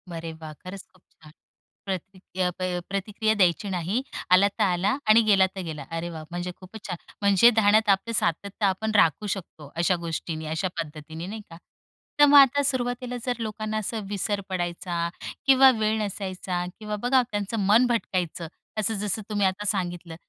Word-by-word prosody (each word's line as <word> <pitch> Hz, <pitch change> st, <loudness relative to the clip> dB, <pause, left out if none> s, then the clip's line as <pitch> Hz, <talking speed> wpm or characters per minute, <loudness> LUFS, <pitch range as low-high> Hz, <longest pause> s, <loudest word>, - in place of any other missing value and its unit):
अरे 165 Hz, 0 st, -5 dB
वाह! 160 Hz, -1 st, -9 dB
खरंच 185 Hz, +5 st, -9 dB
खूप 185 Hz, -, -25 dB, 0.2 s
छान. 155 Hz, -, -14 dB, 0.5 s
प्रति 190 Hz, 0 st, -5 dB, 0.2 s
प्रति 180 Hz, -1 st, +1 dB
प 180 Hz, -1 st, -2 dB
प्रतिक्रिया 210 Hz, +2 st, 0 dB
द्यायची 190 Hz, +1 st, +2 dB
नाही, 185 Hz, +7 st, -1 dB, 0.3 s
आला 190 Hz, +2 st, +7 dB
तर 210 Hz, +2 st, -1 dB
आला 190 Hz, +6 st, +1 dB
आणि 225 Hz, +2 st, +8 dB
गेला 195 Hz, -3 st, +5 dB
तर 190 Hz, -, -4 dB
गेला. 155 Hz, -3 st, -6 dB
अरे 165 Hz, +1 st, -3 dB
वाह, 160 Hz, -2 st, -7 dB
म्हणजे 175 Hz, +1 st, -4 dB
खूपच 200 Hz, +3 st, -12 dB
छान! 180 Hz, -2 st, -4 dB, 0.2 s
म्हणजे 200 Hz, +3 st, +6 dB
ध्यानात 215 Hz, -1 st, +3 dB
आपलं 200 Hz, +4 st, +2 dB
सातत्य 200 Hz, +2 st, -1 dB
आपण 205 Hz, +3 st, 0 dB
राखू 200 Hz, +3 st, +3 dB
शकतो 155 Hz, -6 st, -11 dB
अशा 180 Hz, +1 st, +3 dB
गोष्टींनी, 160 Hz, -1 st, -4 dB
अशा 160 Hz, +5 st, -1 dB
पद्धतीने 160 Hz, +2 st, -8 dB
नाही 215 Hz, +1 st, -6 dB
का? 165 Hz, -, -11 dB, 0.6 s
तर 290 Hz, -, +9 dB
मग 290 Hz, 0 st, +7 dB
आता 280 Hz, +1 st, +5 dB
सुरुवातीला 250 Hz, -1 st, -1 dB
जर 245 Hz, -2 st, -2 dB
लोकांना 215 Hz, 0 st, -3 dB
असं 215 Hz, +1 st, -3 dB
विसर 205 Hz, 0 st, -1 dB
पडायचा, 175 Hz, -1 st, -2 dB, 0.4 s
किंवा 265 Hz, 0 st, +7 dB
वेळ 215 Hz, +1 st, +1 dB
नसायचा, 185 Hz, -3 st, -3 dB
किंवा 210 Hz, -1 st, -4 dB
बघा 255 Hz, +1 st, +4 dB
त्यांचं 205 Hz, +2 st, -2 dB
मन 225 Hz, +5 st, +6 dB
भटकायचं, 180 Hz, -8 st, -2 dB, 0.3 s
असं 215 Hz, +2 st, +1 dB
जसं 210 Hz, +1 st, -1 dB
तुम्ही 205 Hz, -2 st, +1 dB
आता 195 Hz, +2 st, -3 dB
सांगितलं 175 Hz, -5 st, -2 dB
195 Hz, 170 wpm, -25 LUFS, 175-215 Hz, 0.6 s, तर